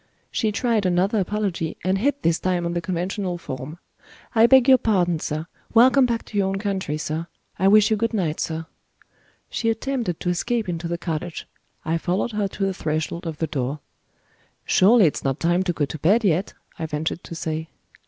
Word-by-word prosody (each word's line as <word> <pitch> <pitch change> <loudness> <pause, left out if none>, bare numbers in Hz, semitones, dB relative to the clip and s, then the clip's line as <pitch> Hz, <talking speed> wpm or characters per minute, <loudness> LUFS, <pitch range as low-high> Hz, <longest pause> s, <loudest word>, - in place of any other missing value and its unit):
She 220 -3 0
tried 220 -2 +1
another 185 +4 +2
apology, 190 -5 -2
and 190 +1 +1
hit 285 +5 0
this 165 0 +2
time 180 -2 0
on 170 - -1
the 175 - -1
conventional 180 +1 -2
form. 140 0 -7 0.6
"I 230 0 +6
beg 265 0 +6
your 260 -1 +7
pardon, 175 -6 +1
sir. 155 +1 -3 0.3
Welcome 255 +3 +6
back 235 -1 -2
to 210 - -6
your 195 - +2
own 195 0 -1
country, 195 -7 -2
sir. 155 +2 -3 0.3
I 190 - +3
wish 210 +2 +6
you 215 - +3
good 230 +1 0
night, 175 -8 -1
sir." 160 0 -3 0.9
She 225 - 0
attempted 225 -5 -2
to 180 - -2
escape 225 +5 -1
into 170 -1 -3
the 170 0 -2
cottage; 170 0 -4 0.4
I 165 +1 0
followed 180 +7 -1
her 210 -2 0
to 195 0 -3
the 195 - 0
threshold 160 +1 -3
of 160 -2 -5
the 160 - 0
door. 140 -1 -3 0.9
"Surely 210 +2 +5
it's 150 - 0
not 135 0 -1
time 175 +2 +2
to 190 -1 0
go 155 -4 0
to 155 - -7
bed 205 +11 +3
yet," 185 -1 +1 0.2
I 160 - -2
ventured 155 +3 -3
to 165 - -7
say. 160 0 -4
180 Hz, 195 wpm, -23 LUFS, 160-215 Hz, 0.9 s, your